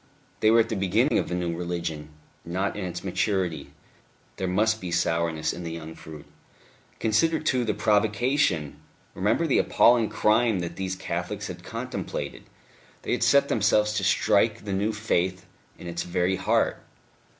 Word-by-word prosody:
They 110 - +4
were 115 +1 +6
at 115 - -2
the 110 - -1
beginning 105 +8 +2
of - - -3
the 90 - -2
new 85 -1 -2
religion, 85 -3 -4 0.3
not 95 +4 -2
in 105 - -4
its 90 - -5
maturity; 95 -2 -1 0.7
there 95 - -2
must 110 +4 +1
be 90 - -5
sourness 85 -2 0
in 90 - -7
the 85 -1 -5
young 80 -1 -7
fruit.... 75 -2 -11 0.7
Consider, 160 +9 +2
too, 130 -5 +1
the 115 - -1
provocation! 105 - +1 0.4
Remember - - +1
the - - +3
appalling 120 -2 +4
crime 110 -1 +2
that 85 - -5
these 95 -1 -3
Catholics - - -4
had - - -8
contemplated; - - -5 0.6
they - - -3
had - - 0
set 140 0 +4
themselves 105 -1 +2
to 105 -2 -1
strike 95 +2 +2
the 100 - -3
new 100 +3 0
Faith 95 -4 -1 0.3
in - - -11
its 85 0 -4
very 90 +1 0
heart.... - - +1
95 Hz, 160 wpm, -26 LUFS, 85-110 Hz, 0.7 s, were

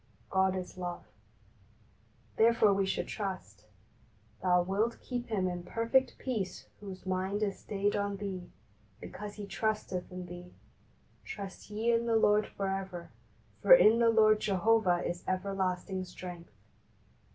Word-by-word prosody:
"God 190 0 +3
is 185 0 -6
love," 175 -1 -4 1.3
therefore 225 -2 +5
we 195 0 +1
should - - -1
trust. 185 - -5 0.8
"Thou 180 -1 +4
wilt 205 +6 0
keep 245 -1 -4
him 195 -4 0
in 175 -1 -3
perfect 230 +8 +1
peace 220 -8 -3
whose 195 -2 -9
mind 190 +3 -1
is 200 -2 -2
stayed 205 0 -1
on 200 -1 -1
Thee, 190 -3 -5 0.5
because 210 -1 -8
he 210 - -6
trusteth 200 -2 -2
in 180 0 -6
Thee. 175 0 -10 0.7
Trust 200 -1 -8
ye 220 +3 0
in 235 0 +1
the 230 - +2
Lord 210 -1 +4
for 195 - -4
ever; 190 -3 -4 0.5
for - - +9
in 230 - +6
the 230 -1 +5
Lord 215 -1 +5
Jehovah 200 -2 +2
is 175 0 -4
everlasting 185 0 -1
strength." 180 -1 -9
195 Hz, 140 wpm, -31 LUFS, 185-215 Hz, 1.3 s, for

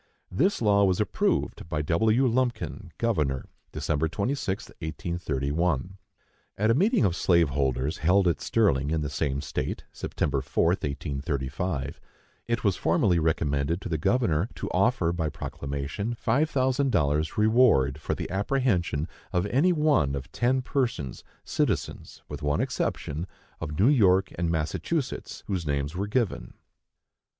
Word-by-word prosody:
This 180 - +1
law 100 -1 +4
was 95 -2 +2
approved 95 -4 0
by 75 -2 -1
W. 110 - +3
Lumpkin, 115 -7 -1
Governor, 75 - 0 0.3
Dec. 80 +1 -1
26, 100 - -2
1831. 80 0 -2 0.6
At 110 +3 +3
a - - +5
meeting 200 - +3
of 90 -3 +1
slave 85 -5 +3
holders 70 0 -1
held 90 +3 +3
at 85 -5 +1
Sterling, 75 - +2
in 80 0 0
the 75 -1 -3
same 70 -2 -1
state, - - -3
September 70 -2 -2
4, 70 - 0
1835, 70 -1 -3 0.5
it 115 0 -1
was 100 -4 +2
formally 85 +1 +2
recommended 80 0 0
to - - -5
the 80 -2 -1
governor 95 -2 +1
to - - -5
offer, 95 -9 +2
by 80 -3 -1
proclamation, 70 +12 -4
five 135 +8 +1
thousand 130 -1 +1
dollars 75 -4 +1
reward 105 - +4
for - - -2
the - - -4
apprehension 95 - 0 0.2
of 90 -1 +1
any 140 - +3
one 150 - +2
of 70 0 -6
ten 130 +2 +1
persons, 115 - -2 0.2
citizens, - - -2
with 75 - -7
one 75 0 0
exception, 80 +6 -2 0.3
of 75 +1 -5
New 105 - +5
York 95 -8 +4
and 85 -1 -1
Massachusetts, 105 - -2
whose 90 -6 -3
names 70 +2 -1
were 100 +3 -2
given. 115 -1 -1
85 Hz, 140 wpm, -27 LUFS, 75-115 Hz, 0.6 s, a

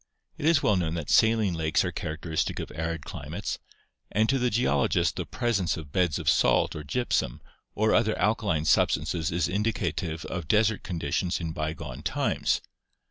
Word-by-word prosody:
It 150 - -2
is 165 -3 +4
well 105 - +4
known 85 -2 -1
that 85 -3 -3
saline 110 -4 +4
lakes 80 +1 +1
are 90 - -1
characteristic 80 -2 -3
of - - -5
arid 80 -1 -3
climates, - - -5 0.5
and 110 +2 +2
to 135 0 +2
the 125 0 +2
geologist 100 - +1
the - - -4
presence 120 -8 0
of 75 -3 -9
beds 90 -3 +1
of - - -6
salt - - +3
or 75 - -5
gypsum 75 - -1 0.4
or 110 +1 +2
other 110 - +2
alkaline 100 -7 +1
substances 80 +1 +2
is 85 -1 +1
indicative 90 -5 -2
of 90 -5 -5
desert 110 +4 +3
conditions 85 +1 -2
in 85 -2 -3
bygone 75 -3 -5
times. - - 0
90 Hz, 165 wpm, -27 LUFS, 80-110 Hz, 0.5 s, is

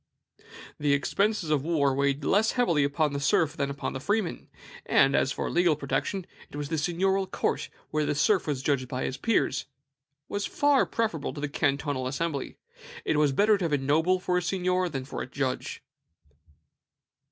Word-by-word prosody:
"The 145 -1 +2
expenses 195 +4 0
of 145 -3 +2
war 145 -4 +2
weighed 140 +1 0
less 215 +3 +3
heavily 170 - +2
upon 145 +1 +1
the 140 - -2
serf 145 +2 +2
than 140 -1 -1
upon 140 0 -4
the 135 - -4
freeman; 205 +4 -2 0.4
and, 135 +1 +4
as 135 - +2
for - - -3
legal 175 -3 +3
protection, 160 +6 -2 0.2
the - - -9 0.2
seigniorial 185 +5 +1
court, - - -2 0.2
where 155 0 +1
the 150 - 0
serf 190 +5 +2
was 140 -3 -2
judged 140 -3 0
by 125 +1 -3
his 130 - -3
peers, 230 - 0 0.6
was 205 0 -2
far 285 -1 +3
preferable 170 -13 -2
to 145 - -6
the 150 - -1
cantonal 140 -2 -1
assembly. 140 +1 -3 0.5
It 155 - +1
was 150 -2 +3
better 205 +8 +3
to 180 - -1
have 160 - -1
a - - +4
noble 160 +7 +2
for 180 0 0
a - - -5
seignior 180 0 0
than 135 -4 -4
for - - -5
a - - -5
judge." 130 -2 -3
150 Hz, 175 wpm, -27 LUFS, 140-185 Hz, 0.6 s, and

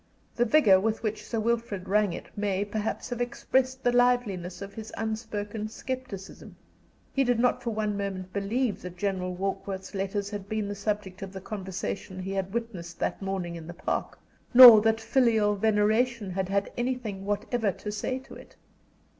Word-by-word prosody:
The 240 - +2
vigor 220 -8 +6
with 220 +3 -1
which 215 -1 -2
Sir 230 - -1
Wilfrid 225 -4 -1
rang 205 0 +3
it - - -7
may, 200 -1 0
perhaps, 215 +4 -3
have 245 0 -2
expressed 260 +2 0
the 245 - +3
liveliness 235 -8 +1
of 200 0 -8
his 220 -1 -8
unspoken 220 -1 -3
scepticism. 255 -5 -7 0.6
He 270 - +3
did 245 -2 +2
not 245 +1 +2
for 235 - -2
one 215 -2 -1
moment 190 -2 -4
believe 210 +3 -1
that 180 0 -8
General 185 -2 -2
Warkworth's 190 +1 -4
letters 200 +1 -2
had 205 -1 -6
been 215 -2 -1
the 205 - -3
subject 200 -2 -3
of 195 -1 -6
the 190 - -6
conversation 190 -1 -5
he 195 - -4
had 195 -1 -2
witnessed 195 -7 -5
that - - -2
morning 190 -3 -3
in 165 -1 -8
the 175 - -8
Park, - - -3 0.4
nor 240 -4 +12
that 225 +1 +2
filial 225 -3 +3
veneration 220 +1 +1
had 190 0 -2
had 200 0 0
anything 240 -6 -3
whatever 205 +2 0
to 210 +3 -6
say 255 +5 -2
to 265 - -12
it. - - -13
210 Hz, 175 wpm, -28 LUFS, 195-230 Hz, 0.6 s, nor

